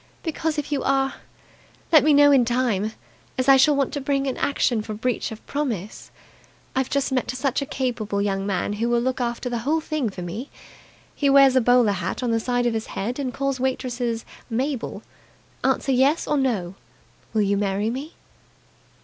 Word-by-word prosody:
"Because, 320 -1 -2
if 295 0 -3
you 280 -2 0
are, 270 0 +1 0.8
let 310 -3 +7
me 305 - +4
know 290 0 +6
in 270 -3 +5
time, 230 -4 0 0.4
as 255 0 0
I 275 - +8
shall 280 +3 +5
want 275 -1 0
to 285 - -3
bring 275 0 0
an 265 - -1
action 250 -5 +1
for 215 0 -6
breach 240 +2 -2
of 220 - -10
promise. 230 -9 -4 0.7
I've 265 -1 0
just 280 0 0
met 255 -2 0
such 260 +2 -1
a 280 - -4
capable 235 -8 -2
young 195 -1 0
man 195 +1 -1
who 230 +3 -1
will 240 0 +3
look 255 +1 -1
after 240 +1 -2
the 240 -1 -2
whole 295 +7 +1
thing 310 -6 -2
for 185 -2 -7
me. 210 +11 -6 0.6
He 285 - +1
wears 275 -1 +6
a 260 - +5
bowler 245 -2 +4
hat 200 - -3
on 240 - 0
the 225 - +2
side 245 +1 0
of 240 - +1
his 220 -1 -3
head 235 +7 -4
and 265 -3 -2
calls 275 +1 -2
waitresses 245 -3 -2 0.2
'Mabel'. 255 +2 -3 0.6
Answer 275 - +1
'yes' 270 +5 +2
or 300 - +1
'no'. 225 -11 0 0.6
Will 215 - +3
you 200 0 +1
marry 200 +2 0
me?" 280 +6 -6
255 Hz, 190 wpm, -23 LUFS, 225-275 Hz, 0.8 s, I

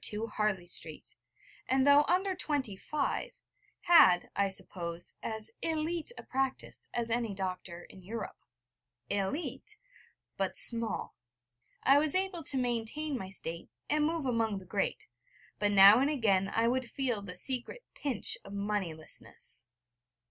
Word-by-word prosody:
II, 210 0 -4
Harley 210 -4 0
Street, 160 -3 -3 0.5
and, 265 0 +3
though 285 +1 +7
under 375 +2 +2
twenty 285 - -2
five, 290 +9 -2 0.5
had, 185 - +6
I 200 0 +2
suppose, 170 -2 -4
as 220 0 -4
élite 325 +4 -1
a - - -7
practice 265 0 -3
as 235 -1 -2
any 230 -3 -1
doctor 185 -2 -5
in 190 - -13
Europe. 215 +4 -6 0.7
Élite 200 - -2 0.6
but - - -1
small. 230 -1 +1 0.7
I 275 +2 +6
was 305 +1 +2
able 375 -2 0
to 270 - +1
maintain 250 +5 -1
my 190 -7 -5
state, 170 -3 -2 0.2
and 300 0 +3
move 325 -2 -1
among 225 -4 0
the 190 - -9
great: 195 +2 -1 0.5
but 205 - +2
now 200 +3 +9
and 275 +2 +2
again 200 -9 +2
I 225 +2 +1
would 250 0 0
feel 245 -6 -1
the 180 -2 -7
secret 265 - -1
pinch 265 -8 0
of 195 - -10
moneylessness. 195 - -4
230 Hz, 140 wpm, -31 LUFS, 195-285 Hz, 0.7 s, now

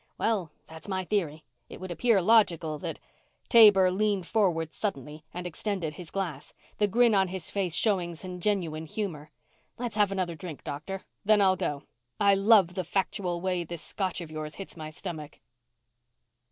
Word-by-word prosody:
"Well... 195 -8 0
that's 160 +3 -11
my 190 -1 -1
theory. 170 -6 -2 0.3
It - - -10
would 185 -1 -6
appear 195 +3 +2
logical 170 -8 +3
that - - -5 0.3
" - - -41
Taber 205 -5 +8
leaned 200 -1 0
forward 170 -7 +1
suddenly 150 - -4
and 180 0 -6
extended 180 -2 -3
his 170 +1 -10
glass, 170 -8 -4 0.2
the 210 - +4
grin 235 +2 +4
on 190 -1 +3
his 185 -2 -3
face 185 -4 0
showing 180 -6 +1
some 180 +2 -7
genuine 170 -5 -1
humor. 165 -7 -4 0.5
"Let's 235 -3 -4
have 205 -2 +3
another 185 -3 -1
drink, 165 -3 -8
Doctor. 160 +7 -5 0.2
Then 215 0 +4
I'll 190 -2 +5
go. 145 -5 -3 0.4
I 200 -1 +5
love 195 -3 +5
the 185 - -2
factual 180 -1 -2
way 180 -1 -1
this 170 -1 -7
Scotch 185 -3 -3
of 165 -2 -8
yours 155 -1 -5
hits 195 - -9
my 155 -2 -7
stomach." 155 -2 -7
185 Hz, 170 wpm, -28 LUFS, 160-200 Hz, 0.5 s, Taber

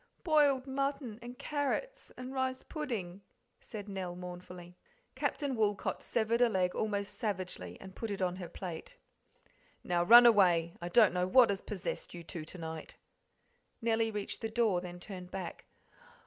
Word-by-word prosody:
"Boiled 290 -5 +4
mutton 275 -4 -2
and 245 +1 -9
carrots 300 - -2
and 255 +1 -6
rice 260 -1 -1
pudding," 210 - -4 0.4
said 210 -2 -8
Nell 190 -3 -4
mournfully. 180 0 -9 0.4
Captain 285 -4 -1
Woolcot 210 -3 0
severed 230 +1 0
a 245 - +6
leg 185 -4 +1
almost 205 -2 -2
savagely 185 - -3
and 190 - -10
put 225 - -4
it 200 - -3
on 180 -1 0
her 175 -3 -6
plate. 175 -2 -7 0.9
"Now 175 -1 +1
run 240 +6 +10
away; 175 -7 +5
I 175 - -4
don't 215 +1 +6
know 180 0 +1
what 240 +1 +6
has 195 - -2
possessed 190 -3 -5
you 170 - -8
two 165 -1 -6
to 180 - -8
night." 160 -1 -7 0.8
Nellie 225 -1 +1
reached 210 -2 -4
the 225 - -2
door, 220 -6 +2
then 175 -1 -8
turned 180 -1 -8
back. 185 -2 -6
200 Hz, 160 wpm, -33 LUFS, 180-240 Hz, 0.9 s, run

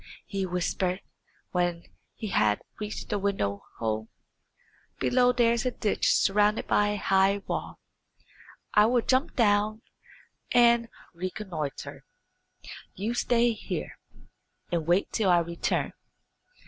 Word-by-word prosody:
he 195 -2 -3
whispered, 180 +1 -1 0.5
when 175 -1 0 0.3
he 215 - -5
had 105 - +2 0.2
reached 210 0 -5
the 205 - 0
window 190 - -1 0.2
hole. 110 -1 -2 0.9
"Below 250 0 +3
there 240 -2 +3
is 235 - -1
a 255 - +1
ditch 220 -4 0
surrounded 210 +2 +2
by 205 - +3
a 205 0 -1
high 195 0 +2
wall. - - -4 0.9
I 210 +1 +6
will 240 0 +2
jump 260 +3 +1
down 215 -1 +2 0.7
and 235 -1 +5 0.2
reconnoitre. 175 -5 -5 0.9
You 210 +5 -2
stay 240 0 +2
here, - - -6 0.7
and 165 -2 -1
wait 175 +3 +2
till 210 -4 +1
I 175 - +6
return." 170 0 -1
205 Hz, 120 wpm, -27 LUFS, 175-230 Hz, 0.9 s, I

